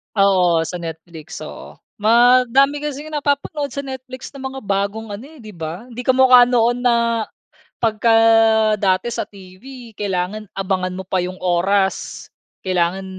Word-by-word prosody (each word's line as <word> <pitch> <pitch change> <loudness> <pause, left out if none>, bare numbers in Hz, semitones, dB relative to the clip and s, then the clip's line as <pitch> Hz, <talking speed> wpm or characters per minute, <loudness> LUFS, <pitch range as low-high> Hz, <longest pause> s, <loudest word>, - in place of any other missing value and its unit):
Oo, 180 -4 +3
sa 175 +2 -6
Netflix, 160 -1 -9
oo. - - -10 0.2
Madami 250 +5 +4
kasing 295 +1 -6
napapanood 285 0 -1
sa 280 - -3
Netflix 260 -1 -8
na 275 - -12
mga 265 0 -6
bagong 200 +2 -2
ano 210 +6 -7
eh, 305 -7 -16
'di 215 - -10
ba? 165 +3 -7
Hindi 245 +2 -8
kamu 260 0 +4
ka 245 -1 +8
noon 240 0 +2
na 245 -1 +2 0.9
pagka 225 0 +1 0.6
dati 190 +2 0
sa 235 - -3
TV 215 +5 -13
kailangan 200 +1 -3
abangan 185 -1 -2
mo 185 - -6
pa 185 -2 0
yung 185 +1 -7
oras. 190 +2 0 0.3
Kailangan 185 0 -1
215 Hz, 145 wpm, -19 LUFS, 185-255 Hz, 0.9 s, ka